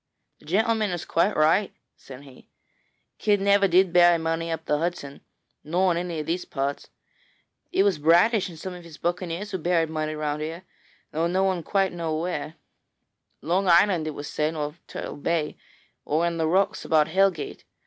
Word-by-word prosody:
'The - - -20
gentleman 220 +4 +1
is 175 -2 -4
quite 175 +5 +1
right,' 165 +6 +2 0.2
said 130 0 -12
he; 135 -3 -17 0.7
'Kidd 205 -1 +2
never 200 0 +4
did 185 0 +3
bury 175 -1 +6
money 165 0 -2
up 160 -1 -4
the 150 - 0
Hudson, 165 -4 -4 0.4
nor 180 +4 +1
in 170 - 0
any 175 -2 -4
of 150 - -4
these 170 +3 -2
parts. 140 0 -4 0.8
It 195 - +3
was 195 -6 +1
Bradish 180 +7 +4
and 165 - -11
some 185 +3 -6
of 180 -1 -10
his 165 -3 -12
buccaneers 175 +3 -3
who 190 - -3
buried 165 -1 +1
money 155 -1 -2
round 150 0 -3
here, 165 +4 -5 0.5
though 165 +2 0
no 185 +2 +1
one 190 -2 0
quite 195 +2 0
knew 165 -2 -3
where: 160 0 -3 0.9
Long 185 +4 0
Island, 175 -2 +4
it 155 - -4
was 145 - -6
said, 155 +2 -1
or 150 -1 -3
Turtle - - -6
Bay, 155 +1 -1 0.5
or 160 +3 0
in 170 -1 -1
the 160 -1 0
rocks 195 +5 +1
about 155 -1 +3
Hellgate. 190 -2 0
170 Hz, 180 wpm, -25 LUFS, 155-185 Hz, 0.9 s, bury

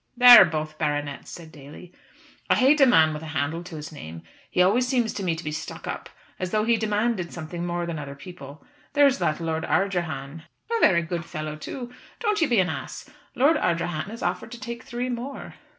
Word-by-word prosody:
"They 250 - +1
are - - +10
both 155 -1 -4
baronets," 145 -2 -2
said 165 -2 -10
Daly. 150 +5 -13 0.6
"I - - +5
hate 280 +3 +4
a 270 - +8
man 160 -9 +5
with 150 - -6
a 160 - -8
handle 155 +3 -1
to 175 -2 -9
his 150 0 -7
name; 80 - -9 0.3
he - - -3
always 210 +8 +4
seems 245 -4 0
to 200 - -5
me 170 -3 0
to 160 - -8
be 150 - -3
stuck 155 - -6
up, - - -5 0.3
as 185 - -2
though 215 +2 +1
he 230 +1 +3
demanded 210 -4 -1
something 170 +1 -6
more 175 0 -2
than 170 -2 -4
other 140 -1 -7
people. 145 -3 -11 0.3
There 290 0 +5
is 275 -1 +3
that 155 - 0
Lord 160 -1 -2
Ardrahan 165 -6 -1 0.2
" - - -21
"A - - +1
very 170 - +4
good 170 0 -4
fellow 155 -2 -5
too. 245 - -7 0.3
Don't 420 -4 0
you 320 - +4
be 240 - +2
an 185 - +3
ass. - - -6 0.2
Lord 300 +5 +4
Ardrahan 170 - -1
has 230 +2 -8
offered 180 +5 -2
to 240 - -9
take 235 -1 -6
three 245 +1 -4
more." 250 +3 -6
175 Hz, 220 wpm, -25 LUFS, 155-235 Hz, 0.6 s, are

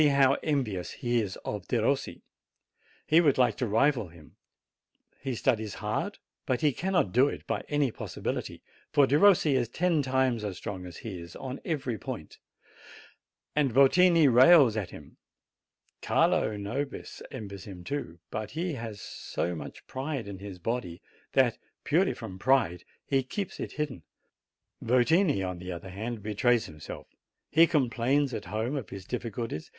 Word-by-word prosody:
fa 140 -1 +5
'rnvious 120 - -1
he 120 -3 0
is 100 -3 -4
of - - -4
Dero - - +2 1.1
He 160 +2 +5
would 145 -5 +3
like 125 -1 +3
to 125 - -1
rival 115 +1 +2
him; 80 -2 -17 0.8
he 135 -2 -3
studies 110 -4 0
hard, - - -3 0.3
but 125 -2 0
he 150 -3 +3
cannr,: 185 +3 +1
do 125 +6 +5
it - - -5
by - - -2
any 145 -4 +1
jility, - - -4 0.3
for 145 - +5
Den: 145 +6 +2 0.2
is 130 -6 +2
ten 170 +3 +1
time 130 -2 +1
as 100 -3 -4
,tron; 95 -3 -5
ht 90 +4 -10
is 85 -6 -7
on 130 0 -6
every 130 - -2
'.'Ant; - - -7 1.2
and 145 -4 +2
Votini 165 +6 +6
rails 130 0 +7
at 100 -5 -2
him. - - -13 0.8
Carlo - - +3
Xobis 135 +8 -5
envies 100 -6 -8
him 95 -4 -9
too; 90 - -4
but 110 -1 -4
he 165 +6 -2
has 115 -5 -6
so 90 -1 -4
much 80 - -8
pride 135 -3 -4
in 100 -2 -7
his 100 -2 -8
h 115 -8 -2 0.3
that, 130 -4 +3 0.2
purely 180 +6 +2
from 95 -5 -8
pride, 110 -9 +2 0.2
he 135 -1 +2
keeps 195 +9 -5
it - - -5
hidden. 150 - -3 0.8
Yotini, 130 - +3
on 90 -1 -5
the 90 +1 -6
other 90 +2 -7
hand, 110 +2 -5
betrays 110 +3 +2
himself: 75 -1 -9 0.5
he 165 +2 +6
com 150 -6 +2
plains 130 +4 +1
at 105 - -4
home 110 +6 -2
of 135 -7 -4
his 95 -1 -8
difficult! 115 -1 -4
' - - -8
125 Hz, 155 wpm, -29 LUFS, 100-140 Hz, 1.2 s, rails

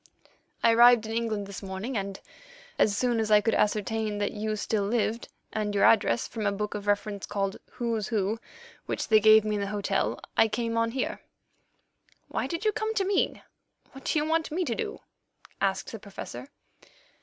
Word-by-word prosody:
I 230 - +6
arrived 240 -1 +7
in 220 - -5
England 225 -3 -1
this 200 0 -8
morning, 195 +6 -5
and 195 -1 -3 0.6
as 200 -1 +3
soon 240 -2 +1
as 220 -1 0
I 210 -1 +7
could 225 +2 0
ascertain 215 0 0
that 205 0 -1
you 215 0 -2
still 210 0 -1
lived, 225 +2 -1 0.3
and 210 -1 -2
your 200 - +3
address, 120 - +4
from 215 -3 -3
a - - +2
book 210 +1 -3
of 205 0 -6
reference 205 -1 -1
called 195 -1 -2 0.2
Who's 230 -4 -2
Who, 215 -1 -1 0.5
which - - -3
they 215 -1 +7
gave 215 0 +7
me 210 -1 0
in - - -2
the 200 - -2
hotel, 205 0 -1 0.2
I 225 - +5
came 230 +1 -2
on 230 0 +2
here." 255 +2 -3 1.1
"Why - - -2
did 335 +5 -4
you 430 - +4
come 435 +1 -2
to 390 - +1
me? 395 0 0 0.5
What 270 0 -13
do - - +1
you 300 - +1
want 320 0 0
me 355 +4 -1
to - - -1
do?" 445 -1 -4 0.6
asked 195 -1 0
the 225 - -7
Professor. 200 +5 -8
215 Hz, 190 wpm, -28 LUFS, 205-235 Hz, 1.1 s, arrived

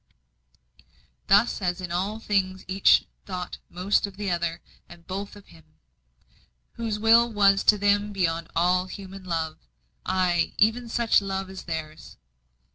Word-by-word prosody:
Thus 205 +3 +3
as 180 -1 -1
in 180 -2 -6
all 195 +5 -2
things 190 -4 -1
each 190 +1 +4 0.2
thought 180 -2 -6
most 195 +3 0
of 195 -1 -13
the 205 -2 -2
other, 170 -1 -2 0.3
and 175 -1 -15
both 195 +3 -6
of 205 - -16
Him 160 - -17 1.1
whose 225 -2 -3
will 230 +2 +5
was 200 -2 +4
to 210 - +6
them 205 +1 +1
beyond 170 -4 -1
all 180 +2 +2
human 195 0 -9
love, 165 -3 -3 0.4
ay, 180 -2 0
even 230 +3 +2
such 230 -2 +3
love 195 -1 -4
as 190 - -9
theirs. 160 -2 -7
190 Hz, 140 wpm, -25 LUFS, 175-205 Hz, 1.1 s, to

